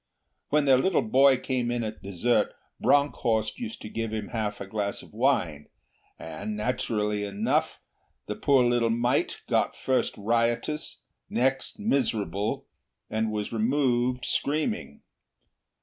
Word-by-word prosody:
When 150 0 +3
their 130 -2 +6
little 190 +6 +2
boy 135 +4 +5
came 125 -2 -1
in 120 -1 -1
at 110 0 -5
dessert 100 +5 +1 0.2
Bronckhorst 120 - +2
used 230 -2 -6
to - - -5
give 115 0 -3
him 110 -2 -4
half 110 -3 -2
a 100 - -5
glass 100 0 -3
of - - -16
wine, 105 - +1 0.5
and, 105 0 -5
naturally 105 -2 -1
enough, 100 +1 0 0.5
the - - -3
poor 135 -3 +3
little 120 -1 +2
mite 120 +2 0
got - - +1
first 130 -1 0
riotous, 115 +7 0 0.3
next 130 +3 0
miserable, 115 - 0 0.5
and 110 0 0
was 105 +1 -3
removed 125 +1 +1
screaming. 155 - -1
120 Hz, 130 wpm, -27 LUFS, 105-130 Hz, 0.5 s, their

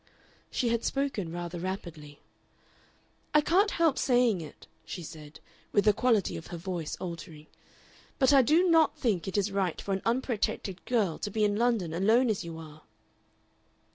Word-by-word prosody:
She 240 - 0
had 230 0 0
spoken 270 -11 -2
rather 175 0 -5
rapidly. 170 -5 -6 1.2
"I 300 - +7
can't 375 +7 +3
help 330 -7 +2
saying 245 -7 +3
it," 155 - -11 0.2
she 175 - -7
said, 150 -1 -11 0.3
with 205 - +2
the 210 - +6
quality 225 -3 +1
of 160 - -9
her 170 - -6
voice 170 -2 -4
altering, 165 -3 -8 0.7
"but 265 0 +4
I 275 - +8
do 315 +8 +3
NOT 325 -3 +4
think 205 - 0
it 195 - -2
is 205 0 +1
right 195 -4 -1
for 200 - -3
an 190 - -2
unprotected 230 -6 -1
girl 210 -10 0
to - - -3
be 215 +1 -1
in 205 -1 +2
London 220 -7 +1
alone 220 +7 +3
as 195 - -3
you 165 -1 -7
are." 155 -1 -11
200 Hz, 170 wpm, -29 LUFS, 170-245 Hz, 1.2 s, I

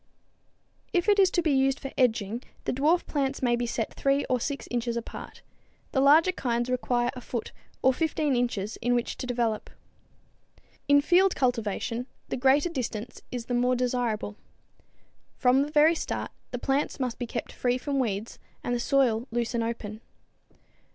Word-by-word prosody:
If 350 -2 +2
to 395 -3 +4
be 315 - +2
used 270 0 +2
for 270 - -6
edging, 230 -3 +1 0.2
the - - -1
dwarf 305 +7 +2
plants 275 -2 -2
may 240 -1 +3
be 240 0 -2
set 230 -1 -2
3 275 +1 +1
or 255 - 0
6 280 +4 -3
inches 240 -1 -1
apart; 235 - -8 0.5
the 265 - +2
larger 310 +6 +6
kinds 240 -7 -1
require 245 -1 +1
a 250 - -7
foot 235 -2 -4 0.3
or 260 - +5
15 305 -1 0
inches 220 -4 -1
in 245 +1 +1
which 240 - -1
to 255 - -5
develop. 235 -3 -1 1.2
In 285 0 +6
field 360 +5 +4
cultivation 235 -1 -1 0.2
the - - -1
greater 270 +6 +3
distance 240 -6 -4
is 245 -2 -4
the 245 - -3
more 250 +1 +2
desirable. 240 -4 -1 1.0
From 255 +1 +4
the 285 - -1
very 305 +2 +6
start 325 - -3 0.2
the 245 - -4
plants 270 +4 -1
must 250 -3 -2
be 245 - -3
kept 235 - -4
free 245 0 0
from 275 +1 -2
weeds 215 -3 -2 0.2
and 245 - -1
the 240 - 0
soil 245 -2 +2
loose 235 +1 -1
and 235 -1 0
open. 225 -2 -5
250 Hz, 165 wpm, -27 LUFS, 235-275 Hz, 1.2 s, larger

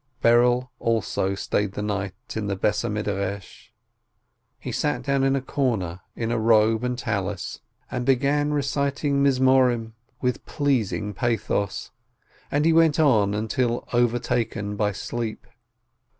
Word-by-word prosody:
Berel 120 +2 +4
also 110 -4 0
stayed 100 0 -1
the 105 - -4
night 100 -2 -2 0.2
in 110 -2 -2
the 100 - -1
house 105 - +1
of 105 -3 -2
study. 100 -2 -2 1.1
He - - -6
sat - - -1
down 140 -1 +1
in 135 0 +3
a 135 - -2
corner, 105 -12 -1
in 115 0 -2
robe 110 0 +3
and 125 0 -1
Tallis, 100 -5 -3 0.3
and 125 - -2
began 140 +3 +2
reciting 140 -1 +1
Psalms 130 -3 +3 0.3
with 125 -1 0
a - - -29
pleasing 115 -7 -1
pathos, 105 -2 -1 0.6
and 145 +2 +1
he 165 - +5
went 165 -2 +4
on 110 -10 +4
until 120 +3 -1
overtaken 115 -3 0
by 105 0 +1
sleep. 110 +2 -5
115 Hz, 135 wpm, -24 LUFS, 105-130 Hz, 1.1 s, he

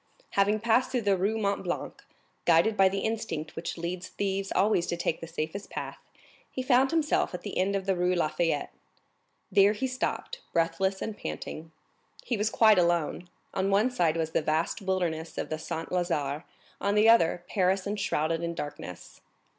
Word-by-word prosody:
Having 205 +2 +2
passed 235 +2 +3
through 245 -3 -1
the 200 -1 +3
Rue 195 +4 0
du 220 - -2
Mont 200 0 0
Blanc, - - -4 0.4
guided 170 +6 +4
by 195 -2 +5
the 195 +1 -2
instinct 220 -9 -3
which 165 - -4
leads 175 +2 -4
thieves 195 -1 -2
always 195 -3 +2
to 170 - -2
take 170 -1 -1
the 165 - -6
safest 165 +4 -4
path, - - -6 0.5
he 255 - -4
found 255 +1 +4
himself 310 - +1
at - - -8
the - - -5
end 195 +2 +1
of 195 -1 -2
the 195 -1 +1
Rue 180 +1 +1
La 170 - +2
Fayette. 160 -2 -1 0.8
There 200 +1 +5
he 220 +5 -2
stopped, 260 - -3
breathless 190 +3 +1
and 220 - -4
panting. 155 - -6 0.5
He 245 - -1
was 210 0 +1
quite 220 -3 +5
alone; 175 0 0 0.2
on 190 +1 0
one 210 +6 +3
side 165 -8 +1
was 160 -1 -1
the - - +1
vast 155 +5 0
wilderness 175 -4 -2
of - - -3
the 155 - -2
Saint 165 0 -5
Lazare, 160 -4 -1 0.4
on 200 +1 +1
the 210 +1 +5
other, 175 -6 +5
Paris 190 -1 +1
enshrouded 165 -6 -1
in 170 0 -3
darkness. 145 - -7
185 Hz, 185 wpm, -28 LUFS, 165-210 Hz, 0.8 s, by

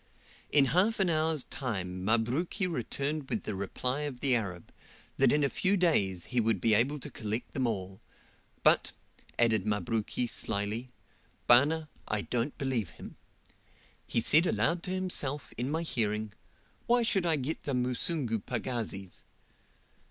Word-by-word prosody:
In 145 -2 +5
half 205 +6 +3
an 190 -3 +3
hour's 155 -2 +1
time 95 -8 -4
Mabruki 120 - +1
returned 145 -1 -3
with - - -2
the 105 - -4
reply 125 +7 -1
of 145 -4 -4
the 130 -2 +2
Arab, 95 -7 -4 0.4
that - - +4
in 150 0 +2
a - - +4
few 195 +7 +1
days 100 - +1
he 125 - +3
would 110 -3 +1
be 110 +4 +3
able 130 +8 +2
to 140 - -5
collect 110 +2 -4
them 130 -3 0
all; 95 -4 -4 0.6
but, - - +4 0.4
added 110 -4 +3
Mabruki, 110 +3 -1
slyly, 110 +1 -1 0.6
"Bana, 150 +6 +5 0.2
I 110 -1 0
don't 125 +3 -2
believe 125 -9 -1
him. - - -11 0.9
He 115 - +1
said 160 +9 +5
aloud 170 +1 +1
to 185 - -3
himself, 175 -7 -3
in 125 +3 -2
my 160 +3 -1
hearing, 110 -7 -1 0.5
'Why 240 0 +4
should 195 -6 +1
I 165 - +3
get 145 +3 -3
the 140 - -2
Musungu 125 0 -1
pagazis? 110 -5 -4
125 Hz, 150 wpm, -30 LUFS, 110-155 Hz, 0.9 s, In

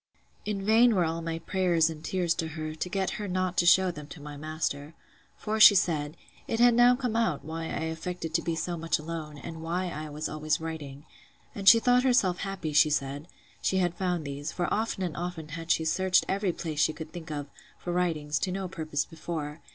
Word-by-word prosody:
In 200 -2 -3
vain 225 +2 +5
were 180 -3 +3
all 165 +1 -2
my 165 0 -3
prayers 170 -1 +2
and 160 -1 -6
tears 175 -1 0
to 165 -1 -3
her, 155 0 -4
to 160 +3 -4
get 190 0 -1
her 205 - -3
not 185 -1 -1
to 175 - +3
shew 185 +1 +6
them 150 -3 -9
to 160 - -11
my 145 0 -8
master. 155 0 -4 0.4
For 215 0 -2
she 210 -1 +10
said, 155 -4 0 0.3
It 225 - -1
had 240 0 +6
now 240 +1 +6
come 245 -3 -2
out, 225 -13 0
why 165 +1 -5
I 160 - -3
affected 165 0 -5
to 165 - +2
be 165 0 -2
so 175 +2 -2
much 165 0 0
alone; 155 -1 -6
and 160 +3 -8
why 175 +3 -2
I 155 -1 -6
was 150 +1 -4
always 155 0 -1
writing. 150 -3 -7 0.5
And 195 -1 +5
she 230 - +8
thought 245 +1 +4
herself 240 -9 +2
happy, 190 -6 -4
she 155 +1 +6
said, 140 +1 -2 0.3
she 190 - +1
had 175 -2 +1
found 180 -4 -2
these; 140 +2 -5
for 175 - -2
often 215 -3 -1
and 175 -4 -3
often 170 -3 -5
had 165 +2 -7
she 160 - +2
searched 185 +3 +2
every 195 -1 0
place 160 -3 -5
she 155 +1 +3
could 160 0 -8
think 175 -2 -8
of, 145 -2 -4 0.3
for 175 - -4
writings, 155 -5 0
to 185 - -1
no 190 0 -3
purpose 155 -4 -3
before. 160 -2 -6
165 Hz, 220 wpm, -28 LUFS, 155-185 Hz, 0.5 s, she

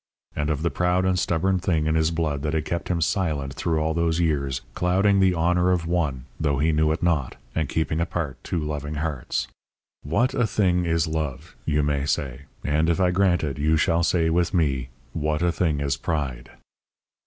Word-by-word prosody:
And 75 +1 -1
of 75 0 -1
the 85 - +1
proud 90 +5 +1
and 95 -1 +2
stubborn 90 +3 +1
thing 85 -4 0
in 80 - +1
his 80 0 +2
blood 80 -4 -1
that 75 +1 -1
had 80 -1 -1
kept 85 -3 -3
him 85 -2 0
silent 75 -6 0
through 80 +2 -1
all 80 +1 0
those 85 0 +1
years, 70 -6 0
clouding 95 +5 +2
the 95 -2 +4
honour 90 +2 +2
of 90 -2 0
one, 75 -7 -1
though 70 -3 +1
he 80 +4 +2
knew 75 0 +2
it 80 - -2
not, 80 -7 +1 0.2
and 80 -1 -1
keeping 80 0 -1
apart 80 -6 -3
two - - -2
loving 75 -1 -3
hearts. 75 -4 -2 0.5
"What 120 - +1
a 120 -4 +1
thing 90 -5 +1
is 80 -1 +2
love!" 80 -1 -4
you 75 -1 +1
may 70 -1 0
say. 70 -1 -2 0.2
And 75 +3 +1
if 85 - +1
I 90 -1 +3
grant 90 -2 +2
it, 70 -4 -3
you 80 +2 +3
shall 85 +1 +2
say, 80 -1 +2
with 90 +3 +1
me: 70 -7 +1 0.2
"What 75 +1 -1
a 90 - +3
thing 80 -4 0
is 70 -1 0
pride!" 70 -8 -3
80 Hz, 200 wpm, -24 LUFS, 75-85 Hz, 0.5 s, the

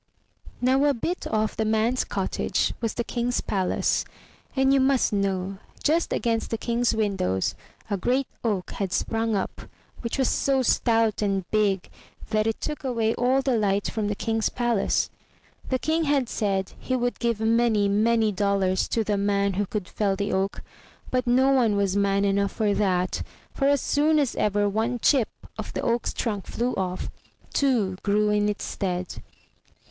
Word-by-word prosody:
Now, 260 +3 +3
a 285 -1 +3
bit 340 +10 -3
off 215 0 0
the 220 - 0
man's 220 +3 +1
cottage - - -1
was 230 -2 -2
the 235 - -1
King's 240 +1 -1
palace, 190 -2 0 0.5
and 265 0 +3
you 275 - +4
must 265 -4 +2
know, 195 -1 -1 0.2
just 325 +3 +2
against 230 -2 0
the 225 - -1
King's 235 0 0
windows 195 - 0 0.3
a 200 - -1
great 255 +8 +1 0.2
oak 205 -6 -1
had 195 -3 -3
sprung 225 +2 0
up, 195 - -3 0.4
which 235 +2 -3
was 265 -2 +2
so 270 -1 +1
stout 225 -3 +2
and 195 -3 0
big 205 -4 +1 0.4
that 215 0 +2
it 225 - -1
took 300 -1 -4
away 230 -4 0
all 260 +2 +2
the 260 -2 +1
light 205 -2 +1
from 215 -2 -2
the 205 - -1
King's 225 +1 0
palace. 240 -4 0 0.6
The 260 - +2
King 320 +4 0
had 280 -4 +2
said 195 -4 -1
he 255 - -2
would 245 -1 -1
give 235 -3 0
many, 220 -2 +3
many 220 +2 +2
dollars 195 -2 +1
to 225 - 0
the 210 -1 0
man 200 0 +1
who 200 +2 -1
could 205 -3 -4
fell 200 -2 0
the 200 +1 -2
oak, 195 +1 -1 0.5
but 250 -1 0
no 260 +3 +4
one 240 -6 +3
was 200 -1 +1
man 200 0 +2
enough 200 0 +1
for 210 -2 +1
that, 185 -3 0 0.3
for 275 - +1
as 285 -1 +3
soon 305 +2 +2
as 280 -5 +1
ever 205 0 +1
one 220 +4 0
chip 245 0 +3 0.3
of - - -5
the - - -2
oak's 235 0 0
trunk 210 -5 -3
flew 245 +2 -1
off, 185 -1 -3 0.4
two 230 -10 +1
grew 210 +1 +2
in 210 0 +2
its 210 - -3
stead. 180 -2 -3
220 Hz, 175 wpm, -25 LUFS, 200-245 Hz, 0.6 s, you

